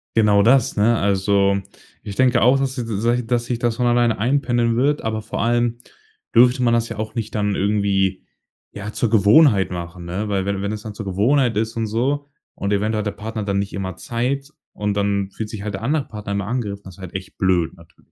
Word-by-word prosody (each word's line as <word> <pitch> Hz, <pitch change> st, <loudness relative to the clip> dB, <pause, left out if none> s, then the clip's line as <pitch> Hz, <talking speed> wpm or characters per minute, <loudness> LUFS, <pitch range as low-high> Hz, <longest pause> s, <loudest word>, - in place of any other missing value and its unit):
Genau 105 Hz, -2 st, +4 dB
das, 130 Hz, +4 st, +4 dB
ne? 110 Hz, +2 st, +3 dB
Also, 100 Hz, 0 st, +2 dB, 0.4 s
ich 100 Hz, -, -7 dB
denke 130 Hz, +2 st, +3 dB
auch, 130 Hz, +4 st, +5 dB
dass 135 Hz, -1 st, -1 dB
si 125 Hz, -, -3 dB
sage 115 Hz, +3 st, 0 dB
ich 115 Hz, -, -12 dB
dass 120 Hz, -1 st, 0 dB
sich 120 Hz, -1 st, -2 dB
das 120 Hz, -1 st, 0 dB
von 125 Hz, 0 st, 0 dB
alleine 120 Hz, -1 st, +2 dB
einpendeln 120 Hz, -1 st, +1 dB
wird, 145 Hz, +5 st, +1 dB
aber 110 Hz, -1 st, -2 dB
vor 110 Hz, -, -4 dB
allem 120 Hz, 0 st, +1 dB, 0.6 s
dürfte 125 Hz, +2 st, +5 dB
man 120 Hz, -1 st, +3 dB
das 115 Hz, 0 st, +1 dB
ja 115 Hz, -, -6 dB
auch 110 Hz, 0 st, -4 dB
nicht 115 Hz, -1 st, -4 dB
dann 105 Hz, -1 st, 0 dB
irgendwie, 100 Hz, -2 st, 0 dB, 0.5 s
ja, 105 Hz, +1 st, -6 dB
zur 115 Hz, 0 st, 0 dB
Gewohnheit 105 Hz, -, +5 dB
machen, 85 Hz, 0 st, -6 dB
ne, 95 Hz, +5 st, -3 dB
weil 100 Hz, -2 st, -1 dB
wenn 100 Hz, -1 st, -2 dB
wenn 100 Hz, -, -1 dB
es 105 Hz, -, -5 dB
dann 110 Hz, 0 st, -7 dB
zur 110 Hz, -, -6 dB
Gewohnheit 115 Hz, +6 st, +2 dB
ist 110 Hz, +1 st, -1 dB
und 115 Hz, -1 st, -1 dB
so, 140 Hz, +6 st, -1 dB, 0.3 s
und 100 Hz, +1 st, -2 dB
eventuell 105 Hz, +2 st, 0 dB
hat 105 Hz, -, -3 dB
der -, -, 0 dB
Partner 110 Hz, +1 st, -5 dB
dann 100 Hz, -1 st, 0 dB
nicht 100 Hz, 0 st, -3 dB
immer 95 Hz, -2 st, -4 dB
Zeit 135 Hz, +4 st, -2 dB, 0.2 s
und 105 Hz, -1 st, -2 dB
dann 100 Hz, -1 st, 0 dB
fühlt 110 Hz, +1 st, -5 dB
sich 105 Hz, -3 st, -6 dB
halt 105 Hz, -1 st, -4 dB
der 95 Hz, -, -7 dB
andere 145 Hz, +2 st, 0 dB
Partner 105 Hz, -2 st, -7 dB
immer 100 Hz, 0 st, -2 dB
angegriffen, 105 Hz, -5 st, -3 dB
das 95 Hz, -, -11 dB
ist 100 Hz, -, -15 dB
halt 95 Hz, -2 st, -8 dB
echt 95 Hz, +1 st, -7 dB
blöd 90 Hz, -4 st, +1 dB
natürlich. 85 Hz, 0 st, -21 dB
110 Hz, 230 wpm, -21 LUFS, 100-120 Hz, 0.6 s, auch